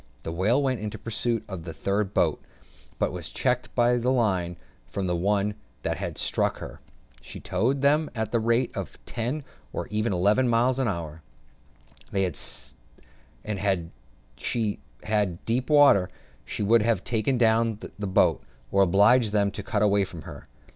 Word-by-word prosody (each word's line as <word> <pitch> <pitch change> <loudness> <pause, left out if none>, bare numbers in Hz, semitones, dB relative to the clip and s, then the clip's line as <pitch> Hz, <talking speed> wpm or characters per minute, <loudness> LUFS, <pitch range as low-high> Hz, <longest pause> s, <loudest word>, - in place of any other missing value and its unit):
The 80 - -4
whale 100 +10 +2
went 130 -3 0
in 105 - -3
pursuit 115 +1 -2
of 95 -5 -6
the 85 -1 -7
third 100 0 -1
boat, - - +1 0.6
but - - 0
was - - -6
checked - - -1
by 120 +1 +4
the 120 +1 0
line 95 -8 +1 0.3
from 95 +10 -3
the 90 -1 0
one 100 +3 +1 0.3
that - - -1
had - - -5
struck - - 0
her: - - -9 0.4
she - - -9
towed 135 +4 0
them 150 +2 +3
at 110 -1 -2
the 115 - +2
rate 115 +2 +1
of - - -5
ten 125 +6 -3 0.3
or - - -4
eleven 105 +2 +2
miles 120 +3 +2
an 130 - +1
hour: 80 -5 -4 0.9
and 95 -3 0 1.3
had 95 -5 0 0.5
she 110 -4 -2 0.2
had 105 -5 -1
deep 125 +4 0
water, 140 -11 +6 0.5
would 110 +2 +4
have 110 -4 +1
taken 120 +2 0
the 115 -2 +2
boat 100 -2 +2
down, - - -29 0.2
or 100 - +4
obliged 105 +5 +5
them 100 -1 +2
to 105 - -6
cut 105 0 0
away 100 -1 +4
from 90 -4 -8
her. - - -10
105 Hz, 160 wpm, -26 LUFS, 95-120 Hz, 1.3 s, water